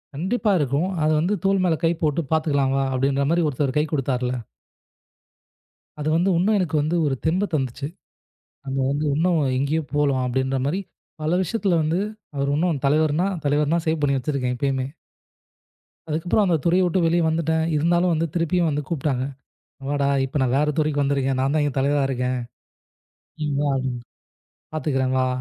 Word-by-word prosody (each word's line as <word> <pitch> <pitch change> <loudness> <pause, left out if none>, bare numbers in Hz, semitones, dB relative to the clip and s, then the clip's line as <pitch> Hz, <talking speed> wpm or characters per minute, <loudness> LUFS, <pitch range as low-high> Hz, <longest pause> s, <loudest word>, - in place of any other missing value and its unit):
கண்டிப்பா 205 - 0
இருக்கும். 145 +5 0 0.2
அது 155 - +3
வந்து 175 +6 +1
தோல் 195 -1 +2
மேல 170 -3 +3
கைப்போட்டு 165 -2 +1
பாத்துக்கலாம் 140 -4 +1 0.2
அப்படின்னு 140 +5 +1
ஒருத்தர் 135 0 -1
கை 150 - +3
கொடுத்தார்ல 125 -3 -1 1.6
அது 150 - -3
வந்து 175 +4 +2
உனக்கும் 210 +4 +3
எனக்கு 175 -4 -1
வந்து 155 +4 0
ஒரு 135 - 0
தெம்பு 180 +6 +2
தந்துச்சு. 135 -1 -2 0.8
நம்ம 135 0 -2
வந்து 145 +2 -1
இன்னும் 165 +2 +2 0.2
இங்கயும் 145 +1 -1
போலாம் 140 -3 +2
அப்படிங்கிற 130 +1 0
மாதிரி. 175 +7 0 0.4
பல 160 +3 +1
விஷயத்துல 190 -2 0
வந்து 160 +4 0 0.4
அவர் 140 0 0
இன்னும் 165 -2 0
தலைவர்னா 155 +4 +2 0.2
தலைவர்னா 150 +3 +2
சேவ் 160 0 +1
பண்ணி 140 -1 +2
வச்சிருக்கேன் 130 -1 -1
எப்பயுமே. 130 0 -1 1.2
அதுக்கப்புறம் 165 +7 +1
அந்தத் 165 -6 +1
துறையை 180 +2 +4
விட்டு 180 +2 +1
வெளியே 170 +1 +2
வந்துட்டேன். 160 0 +1
இருந்தாலும் 175 +3 +2
வந்து 165 +1 0
திருப்பியும் 170 0 +1
வந்து 150 0 -1
கூப்பிட்டாங்க. 135 -5 -1 0.6
வாடா, 145 -1 0 0.2
இப்ப 135 +2 -3
நான் 130 -1 +1
வேற 150 +1 +2
துறைக்கு 150 -1 +1
வந்திருக்கேன். 135 -1 0
நான் 135 +2 +1
தான் 155 - +2
இங்க 145 -3 -1
தலைவரா 140 +1 +2
இருக்கேன். 125 -1 -1 1.0
நீ 155 - -1
வா 145 - +1
அப்படின்னுட்டு. 130 -2 -3 0.7
பாத்துக்குறேன் 135 -4 0
வா. 130 - +2
150 Hz, 155 wpm, -23 LUFS, 135-165 Hz, 1.6 s, துறையை